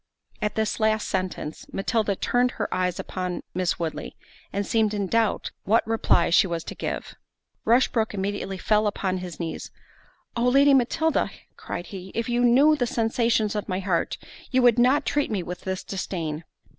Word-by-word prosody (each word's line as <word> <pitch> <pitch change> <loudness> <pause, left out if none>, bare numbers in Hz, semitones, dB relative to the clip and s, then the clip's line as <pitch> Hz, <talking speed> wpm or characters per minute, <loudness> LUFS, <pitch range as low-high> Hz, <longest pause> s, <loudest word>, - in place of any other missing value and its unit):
At 210 0 -1
this 220 +1 -1
last 220 0 +2
sentence, 185 - -3
Matilda 205 0 0
turned 245 +5 +2
her 205 - -2
eyes 180 -1 0 0.2
on 180 -1 -2
Miss 180 -1 0
Woodley, 165 -2 -4 0.4
and 200 +1 -2
seemed 215 -1 +1
in 200 -1 -1
doubt 225 +2 0
what 225 +3 +3
reply 225 -7 +2
she 185 - +5
was 170 -2 -3
to - - -6
give. - - -4 0.5
Rushbrook 230 -2 +2
immediately 195 0 -3
fell 210 +2 +2
upon 190 -2 -1
his 180 -4 -7
knees—"Oh! 205 +7 -6
Lady 280 +2 +6
Matilda," 275 +5 +2 0.3
cried 175 - -6
he, 190 0 -7
"if 230 0 -1
you 240 0 +2
knew 270 +6 +6
the 250 -5 0
sensations 225 -2 +1
of 210 -1 -4
my 185 0 -1
heart, 185 -3 -1 0.3
you 255 -1 +2
would 240 -1 +5
not 255 +4 +4
treat 290 0 0
me 200 -5 -1
with 180 +1 -7
this 190 0 -3
disdain." 165 -5 -4
210 Hz, 170 wpm, -25 LUFS, 185-235 Hz, 0.5 s, Lady